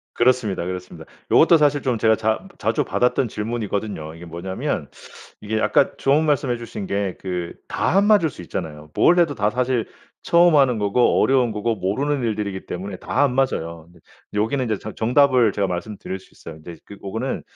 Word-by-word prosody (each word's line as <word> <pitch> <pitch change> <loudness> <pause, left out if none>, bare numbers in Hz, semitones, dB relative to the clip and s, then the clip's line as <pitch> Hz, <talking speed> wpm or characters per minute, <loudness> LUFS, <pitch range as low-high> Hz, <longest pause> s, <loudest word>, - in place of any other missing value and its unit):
그렇습니다, 120 -7 +1
그렇습니다. 90 -3 -7 0.3
요것도 165 +1 +6
사실 145 -2 +2
좀 125 -4 0
제가 110 0 +3
자 110 - -1
자주 110 +2 0
받았던 125 +1 +1
질문이거든요. 105 -7 -4
이게 85 +1 -11
뭐냐면 85 +3 -4 0.5
이게 110 +1 -2
약간 135 - +2
좋은 145 +4 +3
말씀 145 -3 +1
해주신 115 -4 -4
게 100 -2 -2
그 90 -2 -4
다 - - 0
안 200 - +5
맞을 205 -8 +4
수 - - -12
있잖아요. 75 -3 -6
뭘 175 +1 +4
해도 165 -4 +3
다 105 -1 +1
사실 125 0 0 0.4
처음 170 -1 +4
하는 130 -5 +4
거고 105 +4 +2
어려운 130 -3 +3
거고 110 +2 -1
모르는 135 +9 -1
일들이기 105 -4 -3
때문에 95 +2 -5
다 140 - -1
안 125 -3 +1
맞아요. 85 -12 -1
근데 85 0 -21 0.3
여기는 115 +6 0
인제 110 -4 -1
정 110 - -8
정답을 125 -1 +3
제가 100 0 0
말씀드릴 95 +1 -5
수 95 - -21
있어요. 80 - -11
근데 85 0 -9
그 100 - -11
고거는 110 +7 -4
110 Hz, 395 characters per minute, -22 LUFS, 95-130 Hz, 0.5 s, 요것도